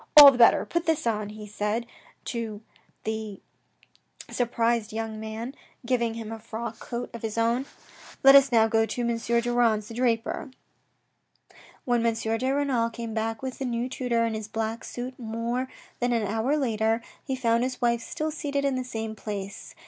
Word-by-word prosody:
" - - -7
All 285 -2 +13
the 255 - -4
better. 235 - +6
Put 340 -1 -2
this 320 -3 +1
on," 215 -3 0
he 210 0 -9
said 210 +3 -2 0.4
to 225 -3 -4 0.4
the 220 -2 -4 0.9
surprised 235 -2 +1
32 - - -9
THE - - -1
RED 225 - -1
AND 220 - -7
THE - - -7
BLACK 220 - -6
young - - -5
man, 230 +5 -5 0.3
giving 235 -2 +1
him 225 -1 -6
a 225 - -6
frock 230 +1 -6
coat 240 +1 -5
of 235 - -7
his 220 0 -4
own. 235 +4 +1 0.3
" - - -18
Let 270 0 +9
us 275 -1 +7
now 225 -2 +5
go 225 0 +2
to 245 - -3
M. 235 -1 +1
Durand's 235 -2 +1
the - - -7
draper." 235 +2 0 1.4
When 240 -2 +2
M. 230 -1 +2
de 225 +3 -1
Renal 270 -5 +1
came 230 -1 -6
back 225 +1 -2
with 260 -1 -4
the 270 - -2
new 240 0 -1
tutor 245 -3 0
in 225 - -1
his 215 -1 -4
black 225 +1 -3
suit 250 +1 -6
more 235 +2 -2 0.3
than 245 0 +1
an 230 -3 +1
hour 225 +8 +1
later, 225 -3 +1 0.2
he 265 - -2
found 235 -2 +2
his 255 +1 -2
wife 235 -1 +2
still 310 +6 -3
seated 285 -2 -2
in 275 - +2
the 255 0 -1
same 225 -3 -5
place. 200 -1 -6
230 Hz, 200 wpm, -27 LUFS, 220-250 Hz, 1.4 s, All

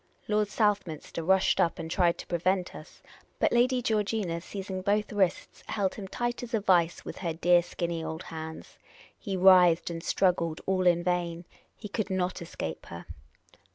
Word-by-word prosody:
Lord 210 0 +1
Southminster 200 -8 -1
rushed 190 +3 +3
up 170 - +2
and 165 -2 -6
tried 175 -1 +2
to - - -8
prevent 180 +2 0
us. 155 - -13 0.3
But - - +2
Lady 250 +1 +2
Georgina, 210 -6 -1
seizing 190 0 -6
both 210 +2 0
wrists, 195 -4 -1
held 200 -4 -1
him 200 -2 -7
tight 240 +4 -3
as 240 -1 -3
in - - +3
a - - -3
vice 175 -4 +2
with - - -7
her 170 -3 -2
dear 175 +2 +4
skinny 170 -1 -4
old 160 +2 -5
hands. 160 -1 -8 0.4
He 195 -2 -3
writhed 180 -2 +6
and 165 0 -5
struggled 170 -5 +1
all 185 -1 +1
in 175 -1 +3
vain: 175 -1 -1 0.3
he 210 - -7
could 210 +1 -3
not 185 -1 -1
escape 80 - -6
her. 85 0 -9
185 Hz, 175 wpm, -28 LUFS, 170-205 Hz, 0.4 s, writhed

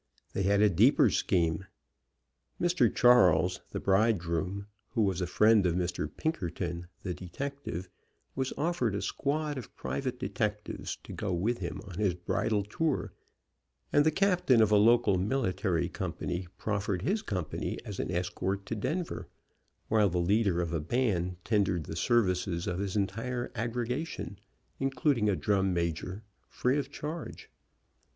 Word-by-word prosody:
They - - -1
had 100 +1 +3
a 105 - +6
deeper 85 - +5
scheme. 85 +1 +1 0.9
Mr. 175 - +3
Charles, 90 -7 +5
the - - -4
bridegroom, 95 -2 +1 0.3
who 115 - +2
was 95 -3 0
a 90 - 0
friend 105 +3 +5
of 85 - 0
Mr. 90 -4 -1
Pinkerton, 85 - -3 0.2
the 90 - -2
detective, 95 0 -5 0.5
was 130 -1 -1
offered 145 - 0
a 100 - -2
squad 145 0 -1
of 125 - -11
private 130 -2 -3
detectives 105 -5 -3
to - - -9
go 105 - -3
with 110 +8 0
him - - -4
on 95 0 -7
his 100 -5 +2
bridal 100 +4 0
tour, 145 +8 -1 0.8
and 145 - +6
the 160 - +4
captain 180 - +3
of 110 -1 +4
a - - +6
local 105 -2 +5
military 95 -5 0
com - - -4
pany 90 +1 -4
proffered 100 -3 -1
his 210 - +1
company 90 -7 -3
as 100 -3 -6
an - - -2
escort 95 +2 -2
to 115 - -3
Denver, 165 - -3 0.6
while 105 -2 +4
the 90 - -1
leader 95 0 +2
of 85 -1 -3
a 85 - +1
band 90 - 0
tendered 100 -6 +1
the 80 - -6
services 90 -3 +1
of 90 0 -2
his 100 -1 -2
entire 115 +5 -2
aggregation, 120 0 -3 0.4
including 135 -4 +1
a 100 - +2
drum 95 -1 +1
major, 85 +4 -2 0.2
free 130 +4 +1
of 140 -1 -4
charge. 155 +3 -6
100 Hz, 150 wpm, -30 LUFS, 90-125 Hz, 0.9 s, a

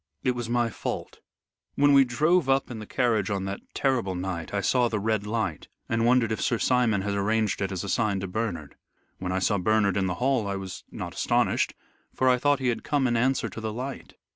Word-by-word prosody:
It 125 - +3
was 120 -2 -4
my 120 -1 +1
fault. - - -5 0.6
When 145 0 +4
we 135 -1 +7
drove 150 +5 +2
up 135 -1 +2
in 115 - -6
the 110 - -8
carriage 110 -6 +1
on 100 -2 -2
that 100 +1 -4 0.2
terrible 120 -9 0
night 90 -2 -4
I 100 - 0
saw 120 +5 +2
the 110 -2 -2
Red 105 0 -1
Light, 110 -8 -2 0.2
and 115 +1 +1
wondered 120 -2 +3
if 110 - -2
Sir 120 - +1
Simon 115 -5 +2
had 100 0 -1
arranged 105 +1 0
it 95 0 -1
as 95 -2 -3
a - - -5
sign 105 -1 +1
to 95 - -3
Bernard. 110 -1 -3 0.5
When 90 0 -3
I 95 - 0
saw 100 +1 +1
Bernard 100 0 +2
in 95 -1 +1
the 90 - -2
hall 125 -3 +1
I 100 - -2
was 95 -1 -7
not - - -6
astonished, - - +1 0.4
for 130 - +1
I 125 -1 +4
thought 145 +2 +3
he 130 -2 0
had 120 - -2
come 145 -3 +1
in 120 -2 +1
answer 130 +3 +1
to 110 - -8
the 110 0 -3
light. 130 +5 -6
110 Hz, 230 wpm, -26 LUFS, 100-125 Hz, 0.6 s, we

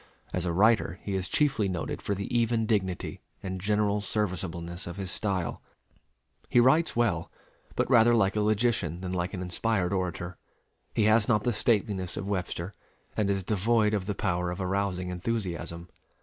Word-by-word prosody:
As 90 -1 -1
a - - +1
writer 100 -1 +3
he 100 - -3
is 95 -1 0
chiefly 135 -9 +2
noted 90 -3 -3
for 100 - -1
the 100 +1 -4
even 115 -1 +2
dignity 95 -5 -1 0.2
and 95 -1 -4
general 105 0 +1
serviceableness 90 -4 -2
of 85 - -6
his 95 -2 -3
style. 95 -5 -1 0.9
He - - +5
writes 145 +7 +4
well, 105 -9 +1 0.4
but - - +1
rather 120 -2 +6
like 100 -3 +2
a 105 - +2
logician 105 -5 +1
than 90 -1 -4
like 90 +2 -2
an 90 - -4
inspired 95 +1 0
orator. 90 -2 -3 0.6
He 110 - +3
has 110 +1 +4
not 105 -2 +3
the 120 - +1
stateliness 100 -5 0
of 95 - -3
Webster, 90 -1 -3 0.4
and 105 -2 +1
is 95 -1 0
devoid 110 +2 +2
of 100 -3 -1
the 105 - -1
power 90 -3 0
of 90 +2 -4
arousing 95 -1 -1
enthusiasm. 90 -4 -3
100 Hz, 170 wpm, -28 LUFS, 90-110 Hz, 0.9 s, rather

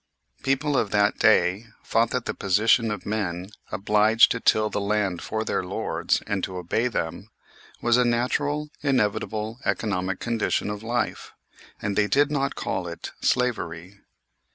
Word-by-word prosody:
People 135 +2 0
of 110 - +1
that 105 0 +2
day 100 +6 +3 0.2
thought 115 +1 +2
that 125 -2 -2
the - - -2
position 110 +4 +3
of 105 -3 -4
men 95 -3 -3 0.2
obliged 105 +2 +4
to 115 - 0
till 110 -1 +3
the 105 - -2
land 100 -3 0
for 110 0 -3
their - - -1
lords, 90 +1 -1
and 100 -2 -2
to 95 - -3
obey 90 +7 0
them, 80 -9 -4 0.5
was 120 0 +4
a 125 - +4
natural, 145 +5 0
inevitable 110 -3 -1
economic 95 -3 -1
condition 115 -3 -1
of 105 0 -6
life, 120 +1 -2 0.5
and 100 -1 -2
they 105 0 +3
did 145 +5 +3
not 140 -2 0
call 95 -2 -3
it 85 - -7
slavery. 100 -7 -1
110 Hz, 155 wpm, -25 LUFS, 100-120 Hz, 0.5 s, obliged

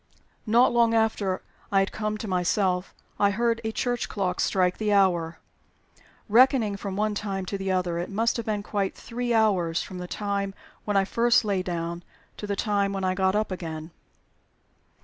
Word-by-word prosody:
Not 235 +3 +4
long 235 -1 +4
after 220 -4 0 0.3
I 195 - +2
had 195 - -1
come 215 0 -2
to 215 - -6
myself 180 0 0 0.2
I 200 - +4
heard 230 +3 0
a 220 - -2
church 245 +2 -2
clock 185 -3 -2
strike 180 -2 +1
the 215 -1 0
hour. 175 -5 +2 0.9
Reckoning 235 -2 +4
from 200 -1 -5
one 210 +1 0
time 195 -2 -3
to 200 - -4
the 195 -1 -2
other, 180 -2 0
it 175 - -4
must 225 +4 0
have 230 - -4
been 210 -2 -1
quite 200 -2 -2
three 245 +1 -4
hours 190 -7 +2
from 185 - -8
the 180 - -6
time 200 0 -2 0.3
when 205 -1 +1
I 195 - +3
first 235 +3 +3
lay 200 -3 +1
down 170 -1 -4 0.4
to 210 - -6
the 200 - -1
time 200 -1 0
when 195 -1 -3
I 185 0 +1
got 190 +1 +1
up 215 -1 0
again." 160 -3 -6
200 Hz, 185 wpm, -26 LUFS, 185-215 Hz, 0.9 s, Not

